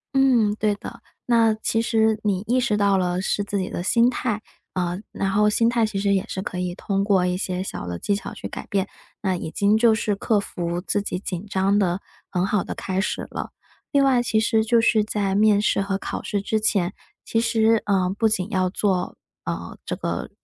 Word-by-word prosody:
嗯， 245 -6 +4
对 215 -1 +1
的， - - -9 0.3
那 230 -2 +4
其 220 +1 0
实， 220 -2 +2
你 200 -3 +1
意 250 +3 +3
识 240 -4 +1
到 200 -1 +3
了 180 -1 0
是 205 +1 0
自 200 0 -2
己 185 - -2
的 175 - -4
心 235 +5 +4
态。 225 -4 -2 0.3
呃， 180 0 -1
然 195 - -1
后 210 +1 +4
心 230 +2 +2
态 235 -1 +2
其 215 -2 -3
实 200 0 +2
也 195 -1 +1
是 190 - -3
可 185 - -5
以 180 -1 -2
通 195 0 -1
过 195 -3 +3
一 180 0 0
些 185 -1 -2
小 190 - -6
的 90 -1 -4
技 205 - 0
巧 200 - -6
去 - - -6
改 - - -7
变。 195 -1 0 0.3
那 190 -2 0
已 165 -2 -5
经 205 +4 +3
就 225 0 +5
是 220 -2 0
克 210 +1 +1
服 175 -3 -3
自 205 +2 -1
己 190 -2 -3
紧 185 -1 -5
张 195 0 +2
的 185 -2 +1 0.3
很 180 -1 0
好 205 -1 +1
的 - - -5
开 190 0 -2
始 - - -3
了。 - - -5 0.4
另 280 -2 +4
外 255 -3 +3
其 220 -2 +1
实 220 0 +2
就 235 +1 +3
是 225 -2 +3
在 205 -2 -1
面 210 0 +4
试 210 - +2
和 195 0 -1
考 - - -5
试 205 - -1
之 215 +2 0
前， 195 -3 +1 0.3
其 225 - 0
实， 225 -1 +3
呃， 190 -3 +2
不 225 - +3
仅 195 -2 -1
要 185 -3 +1
做， 190 -1 -1 0.3
呃， - - -5
这 - - -2
个 - - -3
205 Hz, 240 characters per minute, -23 LUFS, 190-220 Hz, 0.4 s, 就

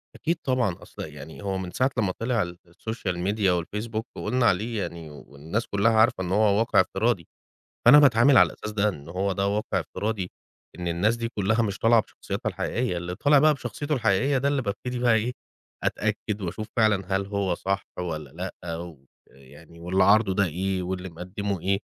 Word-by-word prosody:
أكيد 165 +3 -1
طبعًا، 125 -9 +1
أصل - - -10
يعني 75 +3 -10
هو 95 -1 -1
من 95 -1 -5
ساعة 130 +6 +1
لمّا 100 -4 +1
طِلِع 115 +1 0 0.3
الSocial 100 +1 -4
Media 100 +2 +1
والFacebook 110 +4 -4 0.2
وقُلنا 125 -1 0
عليه 110 +1 +1
يعني 85 -2 -6
والناس 75 - -5
كُلّها 100 +3 +2
عارفة 110 -4 +3
إن 90 - -4
هو 105 0 +3
واقع 115 - +4
افتراضي، - - 0 0.6
فأنا 140 +5 +10
باتعامل 130 -1 +6
على - - +8
الأساس 105 - -7
ده، 105 0 +2
إن 75 -7 -6
هو 95 +3 -1
ده 100 +1 0
واقع 105 +2 0
فتراضي 105 -4 -3 0.5
إن 90 -1 -3
الناس 100 +7 +1
دي 115 0 -3
كُلّها 110 +1 +1
مش 100 -3 -2
طالعة 115 0 +5
بشخصياتها - - -5
الحقيقية، 120 -6 -2
اللي 85 +1 -4
طالع 145 +9 +4
بقى 150 +1 +5
بشخصيته 140 +4 -3
الحقيقية 125 +3 +2
ده 140 +2 +1
اللي 140 -2 0
بابتدي 125 +4 -4
بقى 120 -2 +4
إيه، 110 +3 +1 0.5
أتأكد 105 0 -1
وأشوف 105 +4 -4
فعلًا 100 -4 +2
هل 100 - -2
هو 100 -3 -1
صح 95 +2 -2
والّا 80 -6 -4 0.3
لأ 85 -2 -4 0.5
ويعني 75 +5 -16
واللي 90 +2 +2
عارضه 100 -1 +4
ده 100 +1 +3
إيه 95 +2 -2
واللي 90 +1 -4
مِقَدِّمه 95 +2 -4
إيه؟ 95 +2 +1
100 Hz, 180 wpm, -26 LUFS, 90-115 Hz, 0.6 s, فأنا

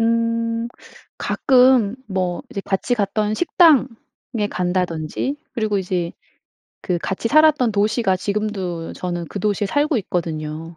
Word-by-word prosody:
음. 230 0 0 0.5
가끔 250 -4 +4
뭐 185 -3 -2
이제 200 - -4
같이 200 +5 0
갔던 210 0 0
식당에 320 -2 +5 0.6
간다든지 180 - -2 0.2
그리고 215 -4 0
이제 180 -2 -2 0.7
그 180 -2 -1
같이 195 +6 -2
살았던 300 -6 +4
도시가 205 -1 +1
지금도 195 -5 -3
저는 175 -2 -4
그 - - -5
도시에 205 0 0
살고 290 +4 +1
있거든요. 165 -3 -4
205 Hz, 255 characters per minute, -21 LUFS, 180-230 Hz, 0.7 s, 식당에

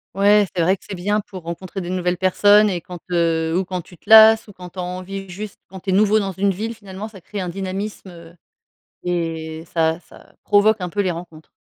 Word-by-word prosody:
Ouais, 205 +1 +5
c'est 175 - +1
vrai 185 +4 +2
que - - -25
c'est - - -6
bien 205 +4 0
pour 190 -2 -10
rencontrer 175 +3 -6
des 175 - -6
nouvelles 180 -1 -1
personnes 205 +3 +5
et 175 -3 -2
quand, 180 +1 -9
heu, 165 -1 +1
ou 190 - 0
quand 180 -1 -4
tu 175 - -17
te - - -32
lasses 220 0 +8
ou 205 - -13
quand 180 -1 -10
tu 190 - -21
as 180 - -2
envie 185 +2 -6
juste, 200 +3 -8
quand 190 +1 -9
tu 190 - -7
es 185 - +2
nouveau 215 +2 +4
dans 195 -2 -2
une 195 +2 +1
ville, 220 +5 -4
finalement 200 -1 -8
ça 215 -3 -13
crée 200 +3 -6
un 180 - -3
dynamisme, 195 +2 -5
heu, 170 0 -14 0.7
et 165 -2 -3
ça 165 0 +1
ça - - -19
provoque 210 +1 +4
un 180 - -3
peu 205 +4 -2
les 185 - 0
rencontres. 165 -2 -9
185 Hz, 235 wpm, -21 LUFS, 175-205 Hz, 0.7 s, lasses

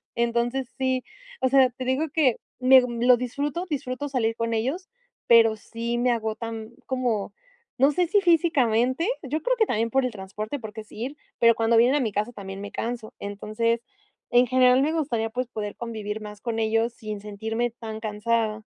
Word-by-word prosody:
Entonces 235 +2 0
sí 260 -1 0 0.4
o 260 - +3
sea, 265 -1 +5
te 255 +1 -7
digo 260 +5 +1
que, 280 -7 +3 0.2
me 260 0 +7
lo 245 0 +3
disfruto 285 +7 -3
disfruto 285 -1 -3
salir 225 -4 0
con 230 0 -2
ellos, 270 - -2 0.4
pero 225 -2 +6
sí 235 +2 -4
me 245 +1 +2
agotan 225 0 -4 0.2
como, 240 -6 -1 0.5
no 275 +3 +5
sé 355 +2 +1
si 405 +4 +3
físicamente, 305 - +2 0.2
yo 295 +4 -2
creo - - +1
que 445 - +4
también 230 0 0
por 265 -1 +2
el 250 - -1
transporte, 210 +6 -6
porque 220 -1 -8
sí, - - -15
ir 285 +2 -7 0.2
pero 230 -1 +6
cuando 225 0 +2
vienen 245 +4 +5
a 295 - +3
mi 225 -4 -1
casa 210 +4 -1
también 195 -2 -7
me 205 - -7
canso. 230 -1 -4
Entonces, 215 +3 -1 0.5
en 245 +1 +5
general 255 +1 +5
me 310 +3 +1
gustaría, 240 -8 -1
pues, 250 +1 -2
poder 210 -3 -5
convivir 220 -2 -5
más 210 -1 -9
con 230 -2 -2
ellos 225 +1 +1
sin 215 -2 -6
sentirme 220 +3 -3
tan 220 -2 -7
cansada. 220 0 -1
235 Hz, 180 wpm, -25 LUFS, 220-260 Hz, 0.5 s, me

